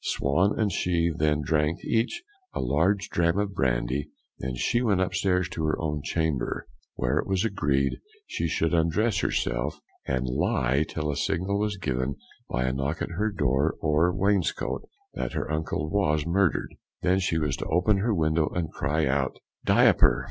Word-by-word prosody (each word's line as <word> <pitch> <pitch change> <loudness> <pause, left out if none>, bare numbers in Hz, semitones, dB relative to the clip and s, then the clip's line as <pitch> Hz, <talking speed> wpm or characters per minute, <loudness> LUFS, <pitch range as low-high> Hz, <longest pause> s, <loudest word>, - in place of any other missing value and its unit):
Swan 90 +11 +1
and 105 -2 +2
she 85 -2 +1
then 75 -1 +1
drank 75 +2 +1
each 115 - 0 0.3
a - - -1
large 95 +7 +1
dram 85 +1 +1
of 100 -1 -1
brandy; 65 +1 0 0.3
then 65 0 -3
she 120 - +1
went 105 -6 +2
upstairs 90 0 +1
into 80 +1 -5
her 75 - 0
own 75 -2 -2
chamber, 80 -4 -1 0.3
where 65 +4 0
it - - -2
was 95 +1 +1
agreed 70 -10 0 0.3
she 85 - -2
should 80 +1 0
undress 95 +6 +2
herself, 70 +2 -1 0.3
and 65 -1 0
lie 65 +2 +1
till 75 -1 -2
a - - -3
signal 95 +7 0
was 105 -1 -1
given 65 -5 -2 0.3
by 65 - 0
a 65 0 0
knock 70 +4 -2
at - - -3
her 105 +6 0
door 70 -5 +1
or 80 +3 +2
wainscot, 95 0 0 0.3
that - - -3
her 75 -1 -3
uncle 75 0 -2
was 75 -4 +1
murder'd, 90 +1 +1 0.3
then 95 +1 +3
she 90 -3 0
was 75 -4 0
to - - -4
open 90 +5 +2
her 110 +4 +1
window, 80 -4 +2
and 85 -2 -2
cry 75 +3 0
out, 65 -1 0 0.3
"Diaper! - - +5
80 Hz, 170 wpm, -27 LUFS, 70-95 Hz, 0.3 s, Diaper